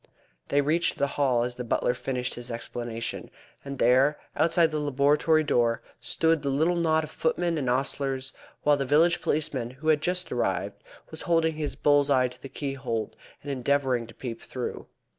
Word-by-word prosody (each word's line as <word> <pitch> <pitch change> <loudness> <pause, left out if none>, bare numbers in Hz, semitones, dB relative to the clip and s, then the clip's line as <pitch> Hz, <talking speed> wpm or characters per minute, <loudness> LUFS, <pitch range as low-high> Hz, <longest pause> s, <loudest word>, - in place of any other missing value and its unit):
They 145 - +3
reached 160 +4 +1
the 140 - +2
Hall 130 -5 +2
as 125 0 -2
the 125 - -6
butler 120 +1 +1
finished 125 0 -3
his 120 0 -7
explanation, 115 -1 -5 0.3
and 140 0 -6
there 130 +5 +4 0.2
outside 165 +1 +3
the 155 - -1
laboratory 145 +2 +3
door 120 -5 +1 0.2
stood 160 -1 +1
the 140 - -1
little 160 +6 +2
knot 160 -2 +2
of 155 - -7
footmen 170 +1 0
and 135 -5 -1
ostlers, 135 +1 -1 0.3
while 145 -1 +4
the 140 - -1
village 170 +5 +4
policeman, 145 -6 -1
who 135 +5 -4
had 150 -2 +4
just 180 +2 -1
arrived, - - -1 0.3
was - - -6
holding 165 -2 +2
his 150 -2 -4
bull's 145 -1 +3
eye 130 -2 +3
to 125 - -14
the 135 - -8
keyhole, 130 -7 -3 0.3
and 145 - -4
endeavouring 130 -2 0
to - - -14
peep 115 -3 -6
through. 125 -2 -6
140 Hz, 180 wpm, -27 LUFS, 125-155 Hz, 0.3 s, there